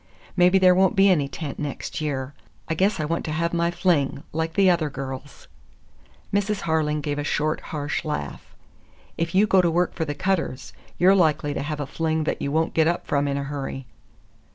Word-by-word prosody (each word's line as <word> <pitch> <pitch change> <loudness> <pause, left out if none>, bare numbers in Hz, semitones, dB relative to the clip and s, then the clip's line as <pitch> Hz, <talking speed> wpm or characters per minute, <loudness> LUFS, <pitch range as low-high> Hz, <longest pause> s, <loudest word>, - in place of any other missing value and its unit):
Maybe 180 +1 +5
there 185 -1 +6
won't 190 +3 +3
be 195 0 +5
any 150 -6 +2
tent 145 0 -6
next 145 +1 -4
year. 140 -2 -3 0.3
I 160 - -1
guess 190 +5 +1
I 155 - 0
want 165 +2 -2
to 155 - -3
have 170 +2 -1
my 170 0 +1
fling, 170 -6 0
like 160 +1 -2
the 195 -1 +4
other 170 -4 +2
girls." 135 +1 -8 0.9
Mrs. 205 0 0
Harling 150 -2 0
gave 145 -1 -2
a - - -2
short, 155 +1 0
harsh 145 -1 -3
laugh. 150 -1 -5 0.6
"If 165 +1 -2
you 200 +3 +5
go 195 -3 +4
to 175 - +2
work 175 +2 +1
for 160 - -2
the 145 -1 -4
Cutters, 145 -8 -2 0.2
you're 185 +2 +5
likely 155 -5 +2
to - - -3
have 150 +1 -4
a 145 - -2
fling 160 +2 -1
that - - -2
you 140 - -2
won't 160 +2 0
get 160 -1 +3
up 175 +1 -1
from 145 0 0
in 140 0 -1
a 140 - -2
hurry." 135 -1 -5
160 Hz, 205 wpm, -24 LUFS, 145-180 Hz, 0.9 s, there